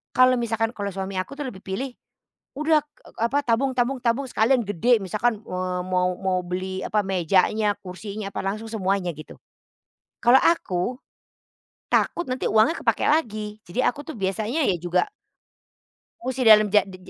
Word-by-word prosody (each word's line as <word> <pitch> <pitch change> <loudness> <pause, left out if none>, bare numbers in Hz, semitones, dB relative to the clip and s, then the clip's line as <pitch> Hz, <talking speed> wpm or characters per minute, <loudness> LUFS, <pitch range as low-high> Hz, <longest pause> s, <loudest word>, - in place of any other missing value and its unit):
Kalo 255 0 +6
misalkan 225 -1 -1
kalo 200 -1 -3
suami 190 0 -4
aku 275 +9 -5
tuh - - -2
lebih 190 -6 -8
pilih, 245 +8 -4 0.7
udah 305 0 +3
k 295 0 -43 0.2
apa 260 +5 +2
tabung 260 +4 +2
tabung 250 +2 +1
tabung 240 +4 +1
sekalian 240 +1 +2
gede. 225 +5 +3
Misalkan, 215 +3 0
eee, 185 -1 -3
mau 180 0 +1
mau 190 -1 0
beli 185 +1 -4
apa? 210 - 0
Mejanya, 195 +3 +2
kursinya, 200 +2 -7
apa - - -3
langsung 215 +3 -3
semuanya, 195 -4 0
gitu. 155 - -12 0.8
Kalo 240 +3 +7
aku, 245 - +1 1.0
takut 345 - +1
nanti 255 0 -2
uangnya 220 +10 +3
kepake - - +1
lagi. 215 -8 0
Jadi 175 +9 -5
aku 280 +4 0
tuh, 315 - -6
biasanya 215 +10 -1
ya 180 - +2
juga, 175 - +1 1.2
musti 260 -2 -2
dalam 215 -1 +8
ja 205 -2 +6
di 185 -1 -10
215 Hz, 160 wpm, -24 LUFS, 190-250 Hz, 1.2 s, dalam